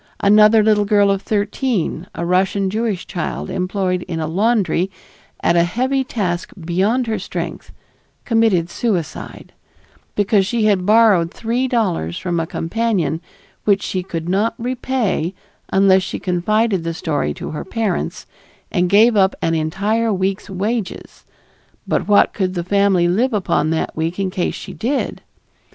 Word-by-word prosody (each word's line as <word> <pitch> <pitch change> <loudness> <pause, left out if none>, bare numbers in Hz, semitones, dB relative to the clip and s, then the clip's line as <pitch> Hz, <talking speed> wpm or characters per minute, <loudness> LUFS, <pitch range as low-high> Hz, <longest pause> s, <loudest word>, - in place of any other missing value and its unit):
Another 210 +2 +6
little 210 -1 +3
girl 205 -1 +4
of 195 -1 -1
thirteen, 205 - -1
a 170 - -3
Russian 190 +2 +1
Jewish 215 -3 -2
child 175 -4 -4
employed 185 -1 -1
in 165 -2 -3
a 160 - -1
laundry 190 0 +1 0.5
at 170 - +3
a 170 - +5
heavy 255 +9 0
task 185 -8 -3
beyond 190 +9 0
her 225 -1 -2
strength, - - -6 0.5
committed 225 -7 +2
suicide, 190 -9 -3 0.6
because 205 -1 +2
she 230 0 0
had 195 -3 +2
borrowed 210 -6 +5
three 240 +4 -1
dollars 185 - -1
from 175 -2 -2
a 165 - -2
companion 170 -5 -1 0.4
which 200 -1 +3
she 185 - -2
could 165 -2 -5
not 205 +5 +1
repay 240 -8 -1 0.4
unless 190 -1 +5
she 185 - -4
confided 195 +2 0
the 165 0 -3
story 145 - -1
to - - -6
her 155 - -5
parents 215 -3 -2 0.5
and 180 -1 +1
gave 220 +4 +5
up 190 -1 +3
an 165 - 0
entire 205 +8 0
week's 190 +1 -2
wages 205 +2 -4 0.6
but - - 0
what 205 -1 +4
could 185 -2 -1
the 175 - -2
family 195 -1 +2
live 230 +9 +1
upon 190 -6 +1
that 160 0 -2
week 165 +2 -2
in 195 -2 -1
case 180 -1 -1
she - - -8
did! 270 +5 -2
195 Hz, 150 wpm, -19 LUFS, 175-220 Hz, 0.6 s, Another